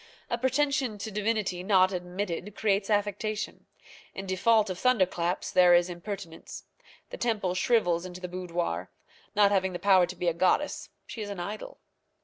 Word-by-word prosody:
A 235 - +1
pretension 265 -2 +1
to 215 +2 -6
divinity 210 -3 -1
not 190 0 +4
admitted 180 +2 -4
creates 200 -1 +1
affectation. 210 +1 -2 0.5
In 195 - -5
default 200 +2 +2
of 180 - -6
thunderclaps 185 -7 +1
there 180 -1 +6
is 175 +1 +2
impertinence. 175 -2 -7 0.5
The - - -6
temple 210 -6 0
shrivels 180 -4 +2
into 180 0 -8
the 180 - -5
boudoir. 175 - -3 0.5
Not 205 -1 +5
having 190 -2 +1
the - - -3
power 190 -2 +4
to 180 - -7
be 175 - -3
a 170 - +3
goddess, 185 - 0 0.2
she 225 - -7
is 205 - -5
an 200 -3 -6
idol. 210 - -6
195 Hz, 160 wpm, -28 LUFS, 180-215 Hz, 0.5 s, there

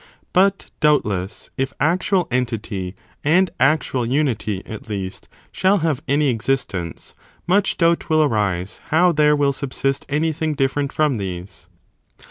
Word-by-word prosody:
But, 195 +1 +2
doubtless, 105 - 0
if 135 0 -1
actual 180 +2 +2
entity 110 -6 -2 0.3
and 180 +5 +3
actual 135 -1 +2
2 115 - -3
ThePhysicist - - -1
unity, 110 -9 -1
at 110 0 -9
least, 95 -3 -5 0.2
shall 190 +2 +3
have 150 -4 0
any 145 +1 +2
existence, 115 -8 -2 0.3
much 195 +2 +2
increases - - -19
the 170 - +3
doubt 170 0 +1
will 155 -1 +4
arise 100 -8 -1
how 175 +3 +4
there 150 -1 +4
will 140 -1 +2
subsist 135 0 -2
anything 155 +1 0
qSn?inT - - -11
different 140 +1 0
from 150 -5 +1
these. 90 -3 -6
135 Hz, 150 wpm, -21 LUFS, 105-155 Hz, 0.3 s, will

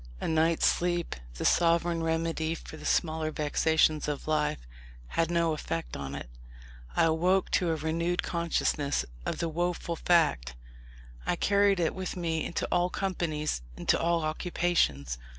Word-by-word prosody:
A - - -3
night's 160 +1 +2
sleep, 175 -1 +1 0.2
the - - -4
sovereign 170 0 +3
remedy 165 0 -1
for 160 - -10
the 150 - -6
smaller 160 -1 +1
vexations 155 0 +2
of 145 0 -4
life, 155 -1 +1 0.5
had 165 0 0
no 170 -2 +2
effect 85 - -4
on 70 -1 -5
it. - - -6 0.7
I - - +4
awoke 175 +4 +2
to 180 - +2
a 165 - +1
renewed 165 +3 -1
consciousness 165 -4 0 0.2
of - - -1
the 170 - -1
woful 170 +1 -2
fact. 150 - +2 0.7
I - - +2
carried 200 +1 +3
it 165 -2 +1
with 185 0 -5
me 165 -2 -1
into 170 - -2
all 175 +1 +2
companies, 165 - -2 0.2
into - - +2
all 170 0 +1
occupations. 155 - 0
165 Hz, 150 wpm, -29 LUFS, 155-175 Hz, 0.7 s, I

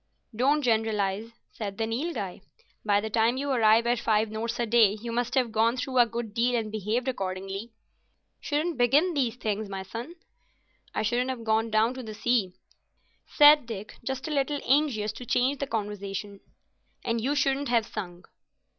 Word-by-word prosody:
"Don't 285 +6 +2
generalise," 220 -2 0 0.2
said 205 -3 -6
the 225 - 0
Nilghai. 225 - -3 0.4
"By 205 -1 +3
the 220 +1 -5
time 230 +3 +2
you 280 +1 -2
arrive 230 -2 +4
at 240 0 +1
five 220 -2 +1
notes 230 +2 -3
a 240 - +1
day 220 -3 +4
you 230 +2 -6
must 240 +2 -1
have 250 -4 +2
gone 225 +3 +2
through 255 0 -1
a 240 - +6
good 230 -1 -5
deal 240 +2 +1
and 220 -2 -2
behaved 220 +4 -2
accordingly. 195 -1 -4 0.7
Shouldn't 305 +1 -2
begin 290 +9 +4
these 250 -6 0
things, 215 -3 -3
my 195 -1 -5
son." 235 - -7 0.8
"I - - 0
shouldn't 245 +4 0
have 250 -3 -4
gone 220 0 +1
down 220 +3 +2
to 260 - -7
the 220 -3 -8
sea," 215 -6 0 0.7
said 295 -3 +6
Dick, 215 -2 -7
just 265 +3 -4
a - - -4
little 285 0 0
anxious 260 -7 +2
to 230 +3 -9
change 260 +5 +1
the 280 - -2
conversation. 200 -3 -4 0.7
"And 230 0 0
you 275 +5 0
shouldn't 280 -1 +1
have 230 -2 +2
sung." 175 -2 -7
230 Hz, 175 wpm, -27 LUFS, 215-255 Hz, 0.8 s, a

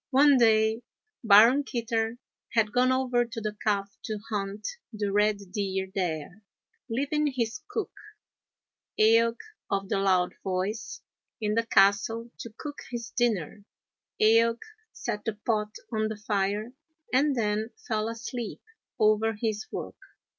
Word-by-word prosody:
One 280 0 +6
day 220 0 +4 0.4
Baron 230 +6 +7
Kitter 230 -2 -2 0.4
had 220 -2 +2
gone 255 +2 +3
over 255 -2 +2
to 235 0 -6
the 215 -1 -4
Calf 200 -1 0
to 215 -1 -3
hunt 205 0 -3 0.2
the 210 -3 -2
red 210 +1 +3
deer 190 -2 -2
there, 180 0 -3 0.5
leaving 285 +6 0
his 250 -1 -2
cook, 415 0 -3 1.1
Eaoch 230 +2 +5 0.3
of 195 -1 -1
the - - +1
Loud 185 -2 +2
Voice, 190 +4 -3 0.4
in 210 -2 0
the 230 +1 0
castle 215 +4 +3
to 230 - -7
cook 295 -1 -7
his 240 -1 -5
dinner. 210 -5 -1 0.6
Eaoch 230 +2 +4 0.3
set 210 0 -4
the 225 - -2
pot 215 -2 0 0.2
on 215 0 +1
the 215 -1 -5
fire 210 +2 -1 0.4
and 280 +2 +3
then 215 -1 0 0.2
fell 215 +1 0
asleep 230 0 -6 0.4
over 215 +1 +3
his 215 -1 -3
work. - - -6
220 Hz, 130 wpm, -28 LUFS, 205-235 Hz, 1.1 s, Baron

